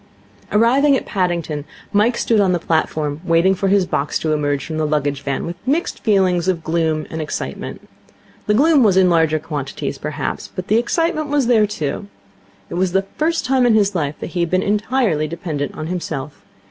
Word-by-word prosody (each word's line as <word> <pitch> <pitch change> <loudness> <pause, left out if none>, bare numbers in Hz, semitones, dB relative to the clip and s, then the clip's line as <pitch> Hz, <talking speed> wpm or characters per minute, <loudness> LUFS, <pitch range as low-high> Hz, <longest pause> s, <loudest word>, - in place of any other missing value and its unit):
Arriving 265 +6 +4
at - - -6
Paddington, 170 -6 -1 0.3
Mike 220 +4 +3
stood 225 -2 +2
on 190 -3 +3
the - - +2
platform, 155 -2 -1
waiting 170 +2 +3
for 195 +1 -1
his 195 -1 +3
box 145 -3 -1
to 155 -1 -1
emerge 145 -2 -1
from 155 -1 -4
the 155 - +1
luggage 145 -2 -1
van, 140 -1 -2
with 170 - -5
mixed 295 +7 -1
feelings 185 -5 +2
of 175 -3 0
gloom 160 -1 0
and 160 - -3
excitement. 155 - -5 0.6
The 210 - +3
gloom 295 +3 +5
was 200 -5 +4
in 185 -1 +5
the - - +2
larger 160 -2 +3
quantities, 145 -3 -5
perhaps, 150 -1 -4
but 185 +2 -7
the 220 - +4
excitement 310 +5 0
was 285 -2 +2
there, 225 -3 +4
too. 150 - -4 0.6
It 175 - -1
was 185 -1 0
the 195 0 +2
first 330 +2 +1
time 260 0 +2
in 240 -3 +4
his 205 -1 +3
life 150 -5 -1
that - - -5
he 180 - -3
had 170 -1 +1
been 185 +2 +1
entirely 210 - +1
dependent 155 -3 -4
on 155 - -4
himself. 155 -5 -5
180 Hz, 200 wpm, -19 LUFS, 155-215 Hz, 0.6 s, gloom